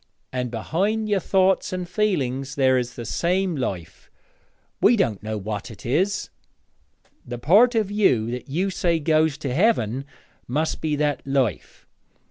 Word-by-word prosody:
And 125 -1 -2
behind 195 - -1
your 205 -2 +2
thoughts 190 +2 +2
and 185 -1 -4
feeling 170 - 0
there 130 -2 +3
is 125 -1 -2
the 120 - -6
same 180 - 0
life 90 - -5 0.7
we 240 - +6
don't 115 - 0
know 110 0 -4
what 105 0 -5
it 110 - -12
is. 185 +11 0 0.9
The 120 0 -6
part 210 - +5
of 215 -3 +1
you 125 - +2
that 125 +2 -6
you 185 +7 0
say 170 -3 0
goes 155 -1 +2
to 135 -3 -4
Heaven 135 - +1 0.4
must 155 +6 -1
be 155 -2 0
that 145 -1 0
life. 135 - -1
150 Hz, 150 wpm, -23 LUFS, 125-190 Hz, 0.9 s, we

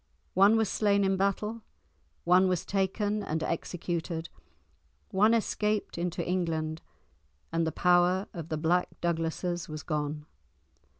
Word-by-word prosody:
One 200 +4 +6
was 220 -1 +2
slain 200 0 +2
in 195 0 +2
battle; 205 +4 -1 0.6
one 180 +2 +5
was 180 -2 0
taken 205 +2 0
and 160 -4 -2
executed; 170 0 -3 0.8
one 210 +3 +4
escaped 210 -1 -1
into 170 0 -2
England; 160 -3 -1 0.7
and 165 0 +1
the - - 0
power 180 +2 +3
of 165 -2 -7
the 155 - -1
Black 170 +3 +2
Douglases 170 +1 -2
was 155 0 -6
gone. 150 -1 -3
180 Hz, 125 wpm, -29 LUFS, 165-200 Hz, 0.8 s, One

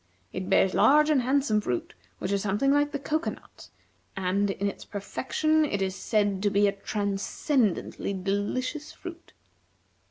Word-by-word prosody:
It 185 0 -4
bears 190 0 +4
large 300 +2 +5
and 280 -4 +4
handsome 260 -4 +2
fruit 125 - -3 0.2
which 185 - -3
is 200 -1 +1
something 210 +8 +1
like 290 +1 +2
the - - -2
cocoanut; 310 +3 -4 0.5
and, 195 +2 +1
in 200 +1 -1
its 200 - -5
perfection, 310 +9 0
is 195 -9 -1
said 205 -3 0
to 205 - +2
be 200 +1 +3
a - - +3
transcendently 205 - -1
delicious 205 +10 -2
fruit." 345 -1 -10
205 Hz, 140 wpm, -27 LUFS, 195-285 Hz, 0.5 s, large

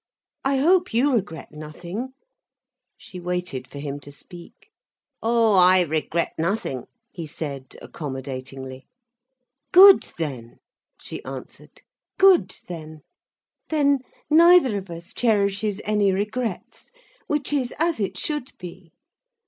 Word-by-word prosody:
I 270 0 +1
hope 350 0 +3
you 270 +4 +3
regret 200 -8 -3
nothing—" 170 +11 -7 0.8
She 180 - -11
waited 180 -7 -4
for - - -11
him 140 0 -5
to 145 - -12
speak. 170 +4 -13 0.5
"Oh, 230 -1 +3
I 185 0 +6
regret 160 +1 -1
nothing," 165 - -2 0.2
he 170 -3 -7
said, 140 -3 -7
accommodatingly. 130 -2 -7 0.8
"Good 385 +2 +9 0.2
then," 130 -8 -5 0.4
she - - -8
answered, - - -10 0.3
"good 385 -2 +5
then. 155 -3 -8 0.7
Then 285 -3 +2 0.3
neither 330 -6 +6
of 195 -2 -5
us 170 0 -9
cherishes 205 -2 +1
any 210 -2 +2
regrets, 210 +2 -4 0.4
which 295 -1 -1
is 260 -4 0
as 330 -3 +1
it 200 - -2
should 295 -5 -3
be." 175 -1 -11
190 Hz, 115 wpm, -23 LUFS, 155-255 Hz, 0.8 s, Good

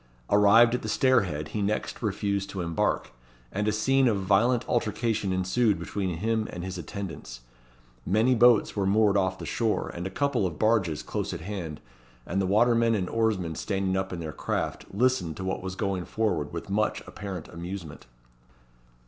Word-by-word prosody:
Arrived 105 +3 +6
at 125 - 0
the 110 - -5
stairhead, 100 - +2
he 105 - -3
next 105 +2 -2
refused 100 -2 -1
to 95 - -4
embark, 85 -2 -1 0.4
and 105 +2 -1
a - - +3
scene 130 +5 +3
of 110 -4 +2
violent 115 +6 +2
altercation 110 -3 0
ensued 95 +4 +1
between 95 -4 -3
him 110 +3 0
and 90 - -6
his 90 -1 -5
attendants. 85 -9 -7 0.6
Many 110 - +3
boats 120 -2 +5
were 100 -2 0
moored 105 0 +3
off 95 -1 +1
the - - -7
shore, 115 -2 -1
with 85 +2 -4
a - - -5
couple 135 -5 0
of 80 -4 -7
barges 105 -8 +1
close - - -3
at - - -7
hand; 85 -5 -5 0.5
and 95 - -1
the 95 - 0
watermen 115 +3 +3
and 95 -4 -1
oarsmen 110 -7 0
standing 95 +2 -1
up 95 0 -2
in 90 - -4
their 80 -2 -5
craft, - - -3
listened 100 -7 +1
to 95 - -5
what 95 0 -2
was 95 0 -5
going 95 -2 -2
forward 90 -10 -1
with 85 - -6
much 105 +2 0
apparent 95 -6 -7
amusement. 85 -4 -7
100 Hz, 175 wpm, -27 LUFS, 90-110 Hz, 0.6 s, Arrived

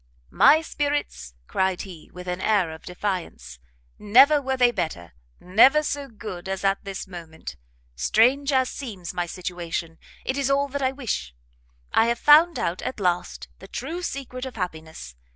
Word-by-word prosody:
"My 315 +2 +6
spirits!" 285 - -3
cried 190 - -1
he, 180 -5 -11
with 180 0 -10
an 180 +1 -3
air 200 -6 +2
of 160 - -10
defiance, 180 - -5 0.4
"never 265 +8 +6
were 265 -1 -2
they 245 -1 +5
better, 85 - -4 0.3
never 255 +11 +5
so 285 -1 -3
good 205 -6 -8
as 195 0 -3
at 195 0 +1
this 195 -1 -6
moment. 170 -4 -9 0.4
Strange 250 - +3
as 260 -2 +2
seems 200 -11 -7
my 175 -1 -2
situation, 170 -2 -5 0.3
it 265 +2 -1
is 275 -1 0
all 280 +1 +2
that 285 +1 -4
I 260 -1 +2
wish; 220 - -4 0.6
I 225 - +4
have 235 0 +1
found 315 +6 +6
out, 170 +2 -2
at 260 - -5
last, 180 -2 -1
the - - -12
true 345 +2 -5
secret 265 -5 -5
of 260 - -9
happiness! 160 - -6
200 Hz, 165 wpm, -24 LUFS, 175-270 Hz, 0.6 s, My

